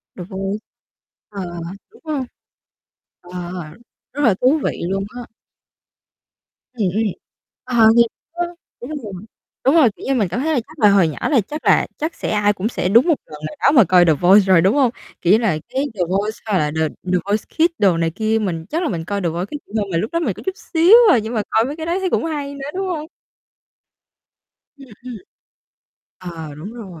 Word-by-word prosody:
The 180 - -7
Voice. 195 +2 -4 0.7
Ờ, 200 -2 -6
ờ, 175 -1 -7 0.3
đúng 450 - -21
hông? 300 -4 -2 1.0
Ờ, 175 - -15 0.8
rất 290 - -3
là 230 - +5
thú 270 +5 +4
vị - - -1
luôn 195 0 -1
á. 245 - -5 1.5
Ừm 220 -6 0
hưm. 220 - +2 0.6
Ờ, 235 -3 +4
thiệt 235 - +7 0.3
á, 350 +1 -1 0.4
đúng 245 - -7
rồi. 205 - -7 0.5
Đúng 270 +4 +4
rồi, 300 -8 +6
kiểu - - -11
như 270 - +1
mình 220 -7 +1
cảm 180 +8 -3
thấy 315 +4 0
là 265 - +2
chắc 310 - -16
là 210 - +6
hồi 195 -4 +4
nhỏ 155 - -5
là 275 -7 +4
chắc 300 +1 -7
là - - +4
chắc 320 +3 -3
sẽ - - -4
ai 210 -1 +2
cũng 200 +2 -2
sẽ 180 - -2
đúng 235 - +5
một 330 - +4
lần 150 -1 -11
nào - - -10
đó - - +6
mà 260 -6 +7
coi 180 -1 +5
The 160 - +5
Voice 185 +7 +5
rồi, 185 -3 +5
đúng 190 +7 +3
hông? 265 -5 +3 0.3
Kiểu 175 - +2
như - - +7
là 210 -10 +1
cái 270 - -1
The 195 - -4
Voice 205 +4 -1
hoặc 210 -3 +1
là 150 -3 0
The 160 - +2 0.2
The 180 - +3
Voice 205 +1 0
Kids 335 +1 +3
đồ 190 -5 +3
này 165 0 +1
kia. 220 +4 0
Mình 170 -6 -3
chắc 330 +3 -1
là - - 0
mình 165 -4 -4
coi 200 +2 -2
The 175 - 0
Voice 170 +3 -3
Kids 290 +8 -8
nhiều 220 -2 +1
hơn, 200 - -9
mà 165 - 0
lúc 215 - -2
đó 335 - 0
mình 270 - -1
có - - -12
chút 380 -1 -2 0.2
xíu 340 +6 +7 0.2
à, 245 - +5
nhưng 220 +2 -5
mà 220 - 0
coi 225 - +2
mấy 280 +3 -4
cái 320 0 -6
đó 345 +3 -1
thấy 380 -1 -1
cũng - - 0
hay 290 -3 -4
nữa, 275 0 -6
đúng 385 0 -2
hông? 320 -4 -3 1.7
Ừm, 275 -1 -13 0.2
ừm. 250 -2 -7 1.0
Ờ, 165 -4 -8
đúng 165 +9 -8
rồi. 190 -9 -10
220 Hz, 225 wpm, -19 LUFS, 185-285 Hz, 1.7 s, thiệt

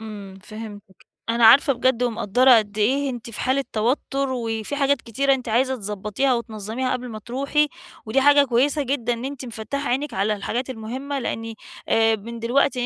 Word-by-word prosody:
إمم 205 -3 -9
فهِمتِك، 210 -2 -11 0.2
أنا 230 0 +4
عارفة 275 +5 +7
بجد 250 -1 +1
ومقدّرة 240 +1 +4
قد 210 -1 -4
إيه 270 +6 +1
أنتِ 240 -2 -7
في 220 - -7
حالة 270 +1 +1
توتر، 270 +4 0
وفي 225 +1 -3
حاجات 280 0 +1
كتيرة 275 +4 +1
أنتِ 255 -3 -6
عايزة 260 +4 +2
تضبطيها 210 +5 -1
وتنظميها 230 +2 -3
قبل 250 0 -4
ما 220 -2 -7
تروحي، 275 +6 0 0.4
ودي 245 +5 +2
حاجة 285 +1 +6
كويسة 275 +4 +1
جدًا 245 -3 -1
إن 235 +2 -5
أنتِ 275 -1 -5
مفتّحة 240 +5 -4
عينِك 275 +4 -1
على 200 +3 +1
الحاجات 245 +6 -3
المُهمة 260 +5 -5
لإني 225 -2 -4 0.3
آآ 225 0 +3
من 230 +3 -8
دلوقتي 250 +3 +1
240 Hz, 175 wpm, -23 LUFS, 220-270 Hz, 0.4 s, عارفة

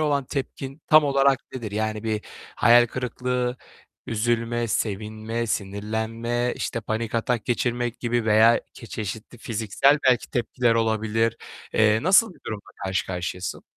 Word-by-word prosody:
olan 145 -3 +1
tepkin 135 +1 -5
tam 155 0 +7
olarak 140 -1 +3 0.2
nedir? 115 -5 -5
Yani 110 0 -2
bir 110 -1 -1 0.4
hayal 120 +1 +6
kırıklığı, 125 +1 -2 0.5
üzülme, 115 +1 0
sevinme, 110 +2 -2
sinirlenme, 110 +4 -2
işte, 115 - -3
panik 110 +1 -3
atak 115 0 0
geçirmek 120 -1 -1
gibi 120 -1 0
veya 110 +2 +5
ke 115 - -11
çeşitli 110 +2 -6
fiziksel 115 +4 +2
belki 125 -2 +2
tepkiler 120 0 +1
olabilir. 115 0 +1 0.4
Eee, 110 +1 +3
nasıl 190 +3 +5
bir - - -22
durumla 105 -2 -6
karşı 95 0 -1
karşıyasın? 90 -2 -4
115 Hz, 130 wpm, -24 LUFS, 110-125 Hz, 0.5 s, tam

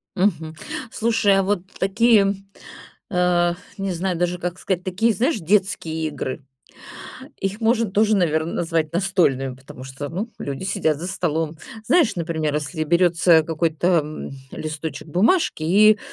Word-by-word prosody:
Мгм, 165 -5 0 0.4
слушай, 225 -3 +2
а 195 - +3
вот 200 -1 0 0.2
такие, 200 0 +4 0.8
э, 175 -1 +2 0.2
не 195 -1 -2
знаю 180 0 -2
даже, 175 +1 0
как 180 +1 -4
сказать, 185 -2 -2
такие, 200 +5 +1
знаешь, 255 - +1
детские 180 -3 0
игры. 145 -2 -5 1.0
Их 195 +2 -3
можно 225 -2 +2
тоже, 215 +2 +3
наверно, 160 -3 +1
назвать 165 -2 -1
настольными. 170 -9 +1
Потому 130 0 -12
что, 135 +2 -6
ну, 195 +9 -4
люди 140 +4 -5
сидят 165 -6 0
за 170 - -6
столом. 165 -4 -1 0.3
Знаешь, 330 -4 +3
например, 160 -3 -2
если 150 +1 -2
берется 170 -1 +4
какой-то, 160 +1 -1
м, 155 0 -6 0.2
листочек 155 +1 -5
бумажки 220 - +2
и, 210 +6 +5
175 Hz, 140 wpm, -22 LUFS, 160-195 Hz, 1.0 s, и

